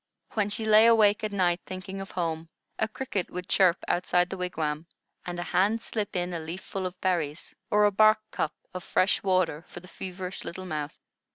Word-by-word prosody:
When 210 -2 0
she 220 +2 -2
lay 220 +1 +7
awake 215 -2 +5
at 215 - -1
night 180 -3 +1
thinking 190 +1 -6
of 195 - -7
home, 165 -2 -3 0.3
a 220 - +2
cricket 215 -4 -3
would 180 0 -6
chirp 185 -2 +4
outside 180 0 +2
the 190 - -4
wigwam, 160 -3 -2 0.4
and 175 0 -4
a - - -1
hand 200 +6 +1
slip 210 -4 -3
in 180 0 -1
a 170 - -2
leaf 165 +4 -6
full 190 -1 -3
of 180 0 -10
berries, 165 -4 -1 0.2
or 210 0 +4
a 205 - +4
bark 215 +2 +6
cup 155 - -2 0.2
of 185 -1 -5
fresh 185 - +2
water 185 -5 +1
for - - -9
the 180 - -15
feverish 185 0 -6
little 185 +2 -7
mouth. 155 -4 -4
185 Hz, 200 wpm, -28 LUFS, 175-205 Hz, 0.4 s, lay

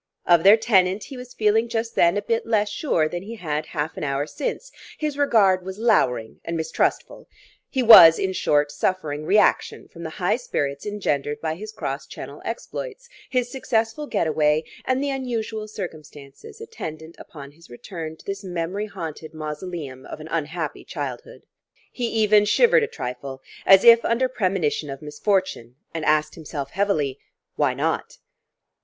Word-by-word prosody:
Of 175 -2 +5
their 200 +5 +7
tenant 195 -3 +2
he 275 - -9
was 250 0 -10
feeling 220 +2 +2
just 230 0 -2
then 170 +3 +3
a 205 - -2
bit 230 +1 -1
less 210 -2 +1
sure 175 - 0
than 175 +2 -5
he 220 +5 -8
had 155 -6 -3
half 150 0 -3
an - - -4
hour 140 0 -1
since; - - -5 0.3
his 300 -2 -2
regard 205 -10 +3
was 190 +1 -7
louring 125 - +1
and 170 0 -3
mistrustful. 160 - -2 0.4
He 260 -3 0
was, 170 -8 +10
in 190 0 -1
short, 145 -4 +1
suffering 155 -1 -2
reaction 210 +2 +2
from 170 - -13
the 165 - -5
high 195 +5 +1
spirits 140 - -3
engendered 150 -8 -2
by 160 -1 -2
his 210 +6 -8
cross 140 -10 -5
Channel 145 +2 -9
exploits, 475 - -6 0.2
his 250 -2 -1
successful 250 +2 -1
get - - 0
away, 155 0 +2 0.2
and 260 +1 0
the 285 - -1
unusual 230 -5 -3
circumstances 170 - -9
attendant 160 - -8
upon 140 -3 -11
his 165 +1 -20
return 160 +5 -8
to - - -19
this 200 +1 -5
memory 180 +3 -3
haunted 160 -4 -8
mausoleum 150 -3 -6
of - - -8
an 155 - -9
unhappy 160 -1 -3
childhood. 140 -8 -7 0.5
He 245 -2 -2
even 215 -2 +3
shivered 475 - +4
a 445 - 0
trifle, 130 - -7 0.2
as 195 0 +8
if 235 0 +8
under 240 +3 +1
premonition 185 - -1
of 135 +1 -7
misfortune, 150 - -1 0.2
and 165 -1 -4
asked 155 0 +2
himself 145 -4 -6
heavily: 155 -9 0 0.4
Why - - +1
not? - - -2
180 Hz, 165 wpm, -23 LUFS, 150-225 Hz, 0.5 s, was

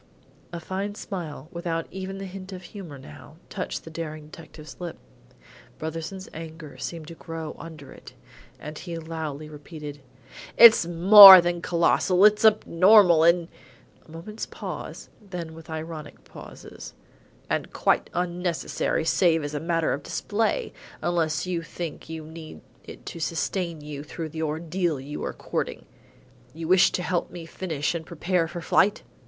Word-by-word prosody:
A 170 - -5
fine 195 +4 -4
smile, 170 -8 -7
without 170 -2 -3
even 190 +1 -6
the 195 - -6
hint 190 0 -9
of 185 -1 -8
humour 175 -8 -10
now, 75 - -13 0.2
touched - - -4
the - - -11
daring 155 -2 -7
detective's 155 -1 -12
lip. 175 -2 -6 0.8
Brotherson's 165 +4 -6
anger 160 -2 -9
seemed 165 -3 -6
to - - -8
grow 165 -1 -7
under 155 -5 -11
it, - - -14 0.5
and 150 0 -8
he 170 -2 -6
loudly 160 -2 -6
repeated: 150 -1 -10 0.6
"It's 230 -7 +8
more 190 +3 +11
than 175 0 -1
colossal; 180 +3 +3
it's 210 0 +4
abnormal 190 -4 +5
and 170 0 +4 0.3
" - - -30
A - - -21
moment's 170 +7 -7
pause, - - -7
then 180 -5 -7
with 165 0 -13
ironic 160 -1 -7
pauses - - -12 0.5
"and - - -2
quite - - +1
unnecessary 175 -2 -2
save 165 -2 +2
as 145 0 -5
a 145 - -2
matter 165 0 0
of 140 - -4
display, 225 - -2 0.3
unless 165 -3 0
you 180 -2 -2
think 165 -1 -7
you 160 -1 -7
need 160 - -11 0.2
it - - -12
to - - -7
sustain 165 0 -2
you 150 -1 -7
through 155 +2 -7
the 160 +1 -6
ordeal 160 +1 -2
you 145 +3 -7
are - - -2
courting. - - -4 0.7
You 165 0 -6
wish 185 +1 +5
to 180 - -2
help 175 -1 -1
me 170 -2 -9
finish 160 -3 -3
and 170 -1 -4
prepare 170 +1 -1
for 170 +1 -7
flight?" 200 +4 +2
165 Hz, 155 wpm, -25 LUFS, 155-180 Hz, 0.8 s, more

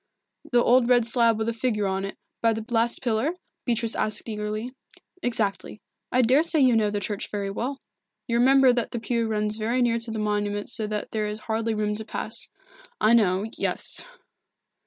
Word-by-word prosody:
"The 240 -1 +4
old 245 0 +4
red 245 -2 +4
slab 230 -1 +3
with 220 0 -2
a 230 - 0
figure 225 -3 -1
on 190 0 -1
it, 195 - -7 0.2
by 230 -1 +3
the 220 0 -5
last 235 +2 +1
pillar?" 240 +7 0 0.3
Beatrice 230 -2 0
asked 215 +2 0
eagerly. 215 +2 -4 0.5
"Exactly. 215 -5 -1 0.3
I 255 +1 +3
daresay 305 +7 +3
you 255 -3 +5
know 215 -2 +2
the 205 0 -2
church 205 0 -4
very 200 -1 -3
well. 260 +7 -4 0.5
You 235 -1 +1
remember 265 0 +6
that 240 -1 -1
the 235 - -4
pew 230 0 -1
runs 210 -1 -1
very 230 +3 -1
near 235 -2 +2
to 230 0 -4
the 225 - -4
monument 205 -1 -1
so 220 -3 -1
that 210 0 -4
there 215 -1 -1
is 210 +1 -4
hardly 225 0 -1
room 210 0 -1
to 220 - -5
pass." 220 +1 -3 0.5
"I 220 - +4
know 200 -3 +3
yes." - - +1
225 Hz, 190 wpm, -25 LUFS, 210-240 Hz, 0.5 s, remember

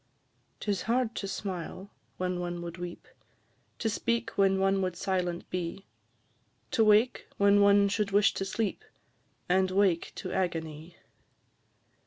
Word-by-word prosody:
'Tis 200 -3 -1
hard 240 -1 +1
to 195 - -4
smile 190 0 -5 0.3
when 180 -1 -2
one 175 -1 -4
would 170 0 -7
weep, 175 0 -7 0.7
To 225 - -2
speak 235 +2 -1
when 195 -1 +3
one 195 0 +2
would 185 -2 -1
silent 180 -1 -2
be; 180 +2 -4 0.9
To 225 - +3
wake 215 +4 +3
when 200 0 +5
one 200 0 +6
should 205 0 0
wish 200 +1 +4
to - - -3
sleep, 200 +2 -2 0.6
And 185 +1 +3
wake 185 -3 +2
to 185 - -5
agony. 165 -2 -3
195 Hz, 135 wpm, -29 LUFS, 175-205 Hz, 0.9 s, one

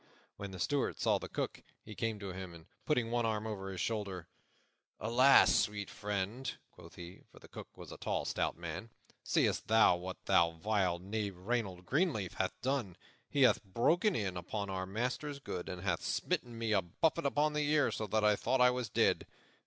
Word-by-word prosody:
When 100 - -6
the 95 - -8
Steward 140 +9 0
saw - - +2
the - - -7
Cook, - - -3 0.2
he 110 - -8
came 115 0 -2
to 100 -2 -6
him, 90 -2 -7
and, 80 -1 -14 0.2
putting 125 -7 +1
one 120 0 +1
arm 110 -1 -1
over 100 -3 -4
his 95 -2 -6
shoulder, 100 -6 -3 0.7
"Alas, 125 +5 +6
sweet 105 -1 0
friend!" 105 +5 -3
quoth - - -15
he 85 +1 -10
for - - -18
the - - -14
Cook - - -9
was - - -10
a - - -8
tall, - - -1
stout - - -1
man 85 +6 -6 0.3
"seest - - +1
thou 110 -4 +6
what 90 +1 -6
that 85 -4 +4
vile 95 -1 +1
knave 100 +1 -4
Reynold 95 -3 -2
Greenleaf 135 - 0
hath 95 0 -2
done? 130 -9 -1 0.3
He 140 - +3
hath 125 -5 +4
broken 165 - +2
in 95 -4 -2
upon 100 +3 -4
our 95 0 -3
master's 125 +8 -2
goods, 90 -10 -6
and 90 0 -6
hath 90 -4 0
smitten 120 -1 -2
me 115 -1 -1
a 100 -3 +4
buffet 155 - 0
upon 150 +2 +1
the 150 -1 0
ear, 150 -2 +3
so 110 - -3
that 110 +2 +1
I 105 0 +5
thought 130 +5 0
I 125 0 +6
was 125 -2 -3
dead. - - +2
105 Hz, 195 wpm, -34 LUFS, 95-125 Hz, 0.7 s, Alas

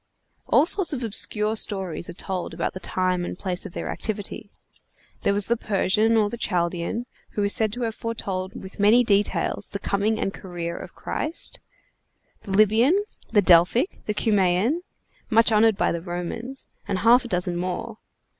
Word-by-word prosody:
All - - +5
sorts 365 -2 +3
of 255 -3 -3
obscure 215 0 +1
stories 190 -6 -1
are - - -6
told 185 +1 -5
about - - -2
the 185 - -6
time 185 0 -1
and 175 - -5
place 185 0 -1
of 175 - -14
their - - -5
activity. 205 -1 -4 0.7
There - - +2
was 200 0 +3
the 235 - +1
Persian 215 +1 +2
or 215 -1 +3
Chaldean, 180 +1 -1 0.3
who 205 - -1
is 200 - +2
said 220 -2 +1
to 245 +1 -3
have 225 -1 -1
foretold 195 -5 -4
with 190 +1 -11
many 215 +5 +5
details 205 -2 0
the - - -4
coming 205 +3 0
and 195 - -2
career 170 -2 -6
of - - -9
Christ; 315 +2 -2 0.8
the 200 - -6
Lybian, 220 - +4 0.3
the 210 -3 +4
Delphic, 180 - +4
the 210 - -1
Cumæan, 205 - +2 0.5
much 230 +1 +4
honored 220 -1 +4
by - - +1
the 170 - -3
Romans, 180 +9 -6 0.2
and 200 -2 -1
half 235 +6 +5
a - - -6
dozen 180 -4 -1
more. 185 +5 -4
205 Hz, 170 wpm, -24 LUFS, 185-225 Hz, 0.8 s, All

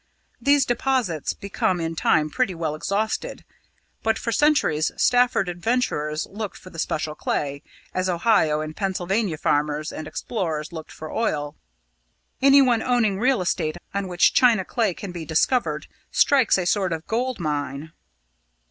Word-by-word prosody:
These 280 +1 +4
deposits 245 - 0
become 190 -2 -1
in 165 0 -3
time 155 -1 +2
pretty 245 -8 0
well 160 -2 -2
exhausted; 200 +7 -2 0.6
but 225 0 +1
for 230 - -3
centuries 255 - +2
Stafford 245 -5 +3
adventurers 175 -5 -1
looked 210 0 -5
for 185 - -13
the 165 - -9
special 155 -1 -2
clay, 140 -2 -2 0.3
as 185 0 0
Ohio 170 -5 +2
and 155 0 -6
Pennsylvania 190 -1 -1
farmers 150 +1 0
and 155 - -7
explorers 165 -8 -3
looked 160 -2 -8
for 155 - -8
oil. 150 -9 -1 0.9
Anyone 270 -4 +5
owning 225 -6 +1
real 255 -2 +2
estate 155 -2 -1 0.2
on 200 -1 -2
which 175 -1 +3
china 230 -7 +4
clay 220 -7 0
can 200 - -7
be 170 -2 -6
discovered 165 +11 +1 0.2
strikes 265 -8 +4
a 180 - -1
sort 185 -1 +1
of 160 0 -5
gold 245 +1 -2
mine." 145 -1 -3
185 Hz, 145 wpm, -23 LUFS, 155-230 Hz, 0.9 s, Anyone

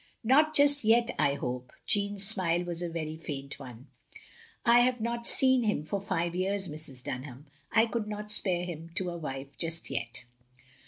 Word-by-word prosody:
" - - -40
"Not 300 +6 +4
just 285 -1 +5
yet, 235 +2 +4
I 140 0 +3
hope," 125 -2 -5
Jeanne's 200 -1 +2
smile 180 -4 +1
was 175 -1 -5
a 175 - -2
very 160 -2 -4
faint 140 -4 -7
one. 125 -2 -10 0.4
" 460 -1 -24
I - - +8
have 250 0 +2
not 235 +1 -2
seen 260 -1 +5
him 210 -9 0
for 195 +5 -3
five 170 -3 -1
years, 190 +1 -1
Mrs. 150 -5 -7
Dunham. 130 +2 -6 0.3
I 220 +1 +5
cotild 225 -2 -3
not 210 0 -5
spare 180 -4 +2
him 165 -2 -7
to 180 -1 -1
a 170 - -5
wife 135 -2 -6
just 165 -1 -2
yet. 120 +2 -4
180 Hz, 190 wpm, -29 LUFS, 150-220 Hz, 0.4 s, I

